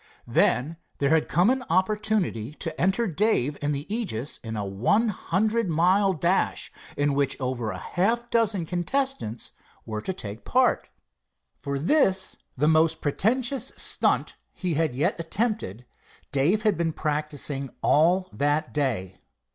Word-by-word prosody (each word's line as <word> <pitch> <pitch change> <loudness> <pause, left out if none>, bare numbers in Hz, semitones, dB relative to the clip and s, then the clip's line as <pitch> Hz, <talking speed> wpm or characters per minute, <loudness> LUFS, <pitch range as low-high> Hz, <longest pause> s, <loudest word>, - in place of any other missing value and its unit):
Then 150 +7 +2 0.2
there 140 +1 +1
had 160 -1 +3
come 180 +8 +3
an 260 0 -1
opportunity 190 - 0
to - - -5
enter 195 +6 +2
Dave 175 - +1
and 145 0 0
the 145 0 -3
Aegis 185 - -3
in 110 -1 -5
a 105 -1 -2
one 125 - +1
hundred 215 +3 0
mile 185 +5 +3
dash 180 +2 0 0.3
in 145 0 +2
which 140 -1 0
over 125 -4 -2
half 195 - 0
a 240 - -26
dozen 215 -6 +2
contestants 180 - -1 0.3
were 110 -1 -4
to 190 - -3
take 110 - -7
part. 255 +1 +2 0.7
For 140 -1 -4
this, 190 - +2 0.2
the 150 +4 +2
most 160 0 +3
pretentious 240 - 0
"stunt" - - +1 0.2
he 180 -3 -2
had 155 -4 0
yet 145 +5 0
attempted, 165 - -2 0.5
Dave 165 +11 +2
had 210 -6 +2
been 165 -2 0
practicing 145 -3 -2
all 175 +5 +3
that 145 +2 0
day. 115 -11 -1
165 Hz, 140 wpm, -26 LUFS, 140-210 Hz, 0.7 s, had